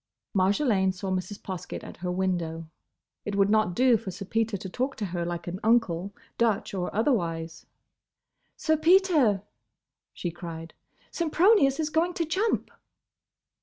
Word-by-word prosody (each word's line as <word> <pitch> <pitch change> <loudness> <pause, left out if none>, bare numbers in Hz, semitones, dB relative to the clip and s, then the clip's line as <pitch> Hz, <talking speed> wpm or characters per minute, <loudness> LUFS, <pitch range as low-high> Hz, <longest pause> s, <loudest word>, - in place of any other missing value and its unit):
Marjolaine 195 0 +2
saw 190 +1 -5
Mrs. 185 +2 -3
Poskett 185 -3 -6
at - - -10
her 180 +1 -3
window. 175 -3 -2 0.6
It 205 - -3
would 200 0 +3
not 215 -5 +2
do 250 -2 +5
for 195 - -7
Sir 195 +2 -7
Peter 225 +1 0
to 190 - -7
talk 255 +8 -2
to 210 - -3
her 175 -2 -3
like 170 0 -4
an 180 +2 -5
uncle—Dutch 210 0 0
or 180 -2 -2
otherwise. 170 - -1 0.9
"Sir 315 -1 +1
Peter!" 315 - +4 0.7
she 175 - -4
cried, 165 -1 -8 0.4
"Sempronius 335 -3 +3
is 310 -1 -1
going 345 +3 +1
to 335 - 0
jump!" 385 +8 0
200 Hz, 140 wpm, -27 LUFS, 180-270 Hz, 0.9 s, do